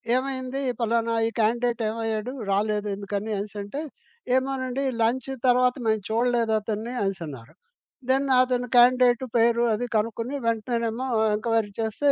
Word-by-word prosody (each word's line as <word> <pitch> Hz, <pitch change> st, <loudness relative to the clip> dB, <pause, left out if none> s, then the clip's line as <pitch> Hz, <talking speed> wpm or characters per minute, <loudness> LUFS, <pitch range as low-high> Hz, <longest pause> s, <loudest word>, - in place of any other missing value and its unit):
ఏమైంది, 260 Hz, 0 st, -2 dB, 0.2 s
ఫలానా 230 Hz, 0 st, +1 dB
ఈ -, -, 0 dB
కాండిడేటేమయ్యాడు 225 Hz, 0 st, 0 dB, 0.2 s
రాలేదెందుకని 205 Hz, 0 st, -1 dB
అనేసి 205 Hz, +1 st, -5 dB
అంటే 205 Hz, +9 st, -5 dB, 0.5 s
ఏమోనండి 260 Hz, 0 st, -1 dB, 0.2 s
లంచ్ 235 Hz, +3 st, +1 dB, 0.2 s
తర్వాత 250 Hz, 0 st, +4 dB
మేము 220 Hz, 0 st, +2 dB
చూడలేదతన్ని 225 Hz, -1 st, 0 dB
అనేసి 195 Hz, -2 st, -2 dB
అన్నారు. 135 Hz, -1 st, -10 dB, 0.6 s
దెన్ 270 Hz, +1 st, +3 dB, 0.2 s
అతను 250 Hz, -1 st, 0 dB
కాండిడేటు 245 Hz, 0 st, +5 dB
పేరు 235 Hz, +1 st, +3 dB
అది 240 Hz, +3 st, -1 dB
కనుక్కొని 230 Hz, +4 st, -1 dB
వెంటనేనేమో 230 Hz, +1 st, -1 dB, 0.3 s
ఎంక్వైరీ 225 Hz, -1 st, 0 dB
చేస్తే, 225 Hz, +6 st, +1 dB
230 Hz, 115 wpm, -25 LUFS, 215-250 Hz, 0.6 s, కాండిడేటు